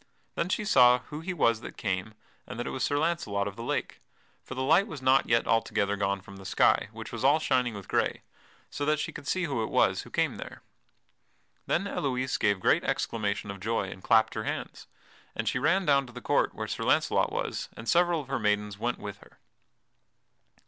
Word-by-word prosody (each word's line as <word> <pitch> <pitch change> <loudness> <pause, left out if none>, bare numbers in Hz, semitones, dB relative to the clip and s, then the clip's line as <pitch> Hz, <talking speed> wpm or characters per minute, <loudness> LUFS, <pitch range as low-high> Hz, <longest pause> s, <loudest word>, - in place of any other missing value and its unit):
Then 170 - -2
she 210 - -1
saw 125 -10 +6
who 150 - -5
he 175 +4 -4
was 115 -10 +2
that - - -9
came, 95 +1 -3 0.3
and 125 - -7
that 120 - -2
it - - -3
was 130 - -3
Sir 145 - +1
Launcelot 145 -12 0
of 100 - -6
the 115 - -8
Lake. 115 - -3 0.4
For 130 - -8
the 130 - -2
light 175 +9 +4
was 155 -8 -7
not 130 +1 +3
yet 115 0 +3
altogether 100 -3 +1
gone 100 -1 -1
from 100 +1 -12
the 95 - -11
sky, 95 - +2
which - - -8
was - - -5
all 140 +3 +5
shining 125 -7 0
with 100 -2 -9
gray, - - 0 0.5
so 145 - -4
that 150 +1 +2
she 150 - -3
could 140 - -10
see 185 - 0
who 135 -8 -1
it 110 - -2
was - - +2
who - - -12
came - - 0
there. - - -9 1.0
Then 175 - +1
Elouise 130 -8 -1
gave 100 -2 +2
great - - +3
exclamation 105 -2 -2
of 100 - -9
joy, 105 -1 -1
and 95 - -10
clapped 110 +3 +3
her 110 - -3
hands. - - -5 0.5
And - - -3
she 125 - +1
ran 175 +7 +2
down 140 -3 +3
to 125 - -13
the 125 - -7
court - - +1
where - - -4
Sir - - -4
Launcelot - - +2
was, - - -3
and 115 - -9
several 175 +1 +3
of 135 - -13
her 135 -1 -2
maidens 105 -1 0
went 120 +2 -1
with 100 -1 -7
her. - - -20
125 Hz, 220 wpm, -28 LUFS, 105-145 Hz, 1.0 s, saw